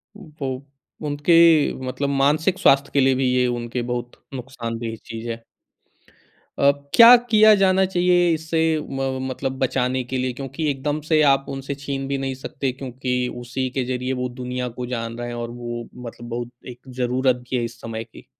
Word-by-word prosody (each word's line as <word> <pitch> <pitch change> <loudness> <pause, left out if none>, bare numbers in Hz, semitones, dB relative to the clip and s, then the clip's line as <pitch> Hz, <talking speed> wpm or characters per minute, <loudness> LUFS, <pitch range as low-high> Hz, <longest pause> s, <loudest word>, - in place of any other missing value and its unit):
वो 140 -8 -6 0.4
उनके 155 +1 +4
मतलब 140 +2 -2
मानसिक 150 +7 +2
स्वास्थ्य 135 +1 +4
के 140 - +3
लिए 135 -1 +4
भी 130 +1 0
ये 125 0 +3
उनके 120 0 -3
बहुत 120 0 -3 0.2
नुकसानदेह 115 -3 -5
चीज़ 115 +1 -6
है। 115 - -2 1.2
अ, 140 - +6 0.2
क्या 235 +1 +10
किया 215 0 +7
जाना 190 -1 +3
चाहिए 175 -1 +3
इससे 160 +1 -1 0.3
म 135 -1 -2
मतलब 130 0 -4
बचाने 130 0 0
के 130 +2 -4
लिए? 130 0 -1
क्योंकि 135 +4 -3
एकदम 145 +2 -2
से 155 +1 +2
आप 135 -1 +3
उनसे 135 0 -4
छीन 140 -1 -4
भी 140 0 -1
नहीं 135 -1 -3
सकते 130 0 -4
क्योंकि 130 -1 -4 0.2
उसी 130 +2 -3
के 130 0 -2
ज़रिए 125 +1 -2
वो 125 - -1
दुनिया 125 0 -4
को 125 +1 -6
जान 115 -2 -4
रहे 120 0 -4
हैं 120 - -5
और 120 0 -4
वो 120 -1 -6 0.2
मतलब 120 +1 -9
बहुत 120 0 -4 0.2
एक 120 0 -12 0.2
ज़रूरत 130 +1 +1
भी 130 - 0
है 120 - 0
इस 120 0 -8
समय 115 0 -5
की। - - -16
130 Hz, 180 wpm, -22 LUFS, 120-145 Hz, 1.2 s, क्या